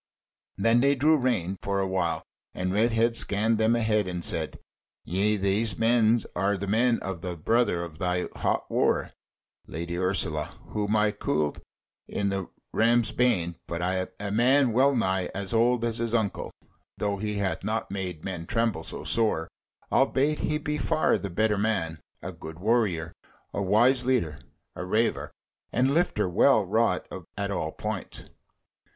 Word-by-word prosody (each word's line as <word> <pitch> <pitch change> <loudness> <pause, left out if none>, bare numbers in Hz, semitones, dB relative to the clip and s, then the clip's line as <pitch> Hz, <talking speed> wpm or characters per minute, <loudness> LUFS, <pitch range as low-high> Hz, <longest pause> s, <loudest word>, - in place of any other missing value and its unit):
Then 115 +1 +3
they 140 +2 +4
drew 150 +4 +4
rein 110 - 0
for 100 0 -1
awhile 95 -3 -1 0.3
and 90 0 -2
Redhead 115 +2 +2
scanned 110 +1 +2
them 110 +2 +3
again 110 -3 +1
and 90 -1 -2
said: - - -1 0.5
"Yea, 100 +4 +1
these 100 +2 +1 0.6
are 100 +3 +1
the 100 - -4
men 115 +4 +2
of 95 -4 -5
the 90 -2 -4
brother 110 0 +1
of 80 -2 -9
thy 90 0 0
hot - - 0
wooer, - - +1 0.6
Lady 85 +2 -4
Ursula, 90 -5 0
whom 105 0 -1
I 105 0 +3
cooled 75 -7 -1 0.5
in 100 0 -1
the 95 -2 -3 0.2
Ram's 115 -1 +3
Bane, 95 -10 +1
but 85 0 -3 0.4
a 100 -1 -4
man 125 +3 +4
well 135 +3 +4
nigh 95 -5 0
as 100 +1 -3
old 120 +1 +3
as 115 -1 -2
his 115 0 -1
uncle, 110 -4 -1 0.5
though 100 -1 -1
he 105 +1 -3
hath 100 -2 -2
not 110 -1 -2
made 90 -5 -5
men 90 -3 -5
tremble 115 -6 0
so - - -6
sore, 110 -8 +1 0.4
albeit 150 +3 +2
he 150 - 0
be 150 0 -3
far 155 +1 +2
the 100 - -5
better 105 +3 +1
man, 95 -7 -1 0.2
a - - -4
good 80 0 -10
warrior, 95 -5 0 0.4
a - - -2
wise 120 +7 +3
leader, 120 - 0 0.4
a - - -5
reiver 110 +5 0 0.4
and 130 +3 +2
lifter 155 - +1
well 90 - +4
wrought - - +1 0.3
at 100 -1 -2
all 85 -5 -2
points. - - -5
105 Hz, 155 wpm, -27 LUFS, 90-115 Hz, 0.6 s, they